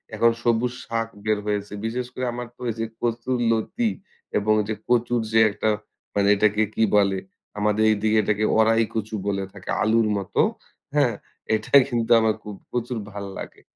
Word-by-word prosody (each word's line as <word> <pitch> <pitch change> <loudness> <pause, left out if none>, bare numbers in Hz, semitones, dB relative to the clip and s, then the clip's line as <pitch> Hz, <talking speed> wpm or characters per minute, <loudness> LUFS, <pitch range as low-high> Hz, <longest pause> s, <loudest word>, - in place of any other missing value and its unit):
এখন 115 +2 +4
সবুজ 120 +1 +2
শাক 115 0 -2 0.2
বের 110 -1 +2
হয়েছে, 105 0 -2
বিশেষ 125 +2 -2
করে 130 - -3
আমার 120 0 -5
তো - - -18
এই - - -7
যে, 115 - 0 0.2
কচুর 120 +2 -1
লতি 220 - 0 0.5
এবং 110 +1 +2
যে, 110 - -1 0.2
কচুর 120 0 +2
যে, 110 - +4
একটা 110 +2 -1 0.5
মানে 100 0 +3
এটাকে 105 +1 +3
কি - - +2
বলে 100 -1 +3 0.4
আমাদের 105 +1 +2
এদিকে 110 +1 +1
এটাকে 105 +1 +1
ওড়াই 115 +1 +4
কচু 110 0 -3
বলে 100 -1 0
থাকে, 100 -2 -11
আলুর 110 0 +3
মতো, 100 -2 0 0.5
হ্যা। 145 -3 +5 0.5
এটাই 120 +6 +5
কিন্তু 115 -2 -1
আমার 110 -1 +2
খুব 105 -1 -7 0.2
প্রচুর 120 0 -2
ভালো 100 -1 -6
লাগে, - - -9
110 Hz, 170 wpm, -24 LUFS, 105-120 Hz, 0.5 s, হ্যা